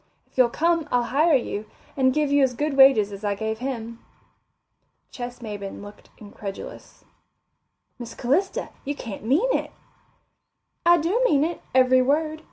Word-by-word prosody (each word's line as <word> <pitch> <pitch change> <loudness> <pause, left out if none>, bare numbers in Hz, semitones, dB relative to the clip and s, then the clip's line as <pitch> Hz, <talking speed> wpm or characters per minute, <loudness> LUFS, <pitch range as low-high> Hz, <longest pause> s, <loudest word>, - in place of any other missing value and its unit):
If - - -36
you'll 255 -2 +4
come, 330 +3 0
I'll 245 -1 +2
hire 310 +2 +4
you, 215 -4 -2 0.3
and 260 -1 +3
give 295 +1 0
you 285 0 +4
as 260 -2 +2
good 295 +2 -2
wages 265 -7 +6
as 200 +1 -9
I 205 -1 0
gave 220 +1 -3
him." 235 -3 -5 1.1
Ches 245 0 -7
Maybin 205 -3 -7
looked 205 0 -13
incredulous. 205 -2 -10 0.9
"Miss 235 -1 -8
Calista, 295 +11 -1
you 285 +1 -3
can't 225 -8 -8
mean 325 - +2
it." - - -2 1.2
"I 345 0 +7
do 345 +9 0
mean 295 - +3
it, 335 +1 -3
every 255 0 +5
word. 305 +4 0
260 Hz, 155 wpm, -24 LUFS, 225-300 Hz, 1.2 s, I